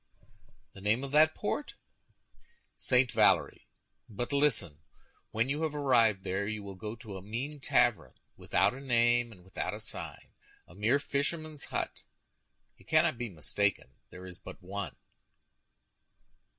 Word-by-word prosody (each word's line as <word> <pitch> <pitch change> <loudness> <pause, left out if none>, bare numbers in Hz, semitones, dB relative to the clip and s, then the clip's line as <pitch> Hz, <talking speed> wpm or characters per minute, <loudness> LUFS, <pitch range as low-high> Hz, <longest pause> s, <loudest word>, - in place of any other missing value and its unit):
"The 95 - -12
name 110 +6 +1
of 135 - -5
that 155 +2 +5
port?" 285 +7 -3 1.0
"St. 125 -1 +3
Valery; - - +3 0.4
but 120 +5 -4
listen. 120 - +1 0.5
When 115 +3 0
you 145 +3 -1
have 155 -2 -1
arrived 115 -9 +3
there 95 +1 -1
you 105 -1 -4
will 100 -1 -7
go 105 +4 -6
to 110 -3 -8
a - - -8
mean 125 +9 -5
tavern, 95 - +2 0.2
without - - +2
a 130 - -8
name 120 -2 +3
and 90 -5 -15
without 95 +1 -4
a - - -7
sign—a - - -10
mere 110 +8 +2
fisherman's 150 +2 -2
hut. - - -3 0.8
You - - -20
cannot 120 - +3
be 120 -1 -3
mistaken; 100 +3 -1 0.2
there 90 0 -10
is 90 0 -10
but - - -10
one." 95 -6 -5
115 Hz, 140 wpm, -31 LUFS, 100-140 Hz, 1.0 s, that